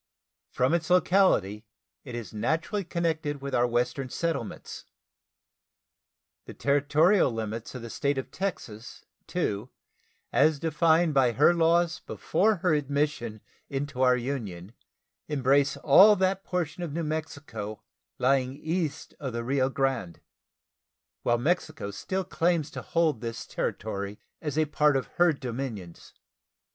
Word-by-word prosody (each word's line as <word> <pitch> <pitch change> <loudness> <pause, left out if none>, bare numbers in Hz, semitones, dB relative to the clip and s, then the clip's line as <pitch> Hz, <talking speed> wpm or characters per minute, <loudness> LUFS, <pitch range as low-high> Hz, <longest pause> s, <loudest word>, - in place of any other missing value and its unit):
From 130 +5 +1
its 170 -1 0
locality 180 - +3 0.4
it 125 -4 -7
is 115 -5 -7
naturally 160 - -1
connected 160 -4 -2
with 140 0 -6
our 120 +1 +3
Western 125 +2 -1
settlements. 165 -9 -4 1.6
The - - -10
territorial 145 +5 +3
limits 115 +1 -5
of 125 - -6
the 115 - -7
State 140 +4 -1
of 135 - -4
Texas, 120 - -5 0.2
too, 105 +5 -2 0.6
as 155 -1 +4
defined 160 +1 +2
by 130 -4 +3
her 150 +8 +5
laws 170 +1 +2
before 215 +2 +1
her 180 - +4
admission 140 -6 -1 0.3
into 140 -1 -3
our 125 -1 +5
Union, 110 -7 -5 0.5
embrace 140 -1 +2
all 200 +9 +7
that 190 0 0
portion 180 -1 -3
of 170 -4 -4
New 170 +1 -2
Mexico 145 -9 -5 0.3
lying 130 0 +1
east 160 0 -3
of 135 -4 -4
the 120 0 -3
Rio 130 +1 +1
Grande, 130 -11 -1 1.0
while 120 - +2
Mexico 155 - -1
still 190 - -3
claims 165 -4 0
to - - -6
hold 160 -8 0
this 115 -1 -5
territory 100 -1 -4 0.2
as 150 -2 -3
a 155 - +3
part 150 -1 +3
of 130 - -2
her 175 -1 +5
dominions. 120 - -6
140 Hz, 130 wpm, -27 LUFS, 120-165 Hz, 1.6 s, all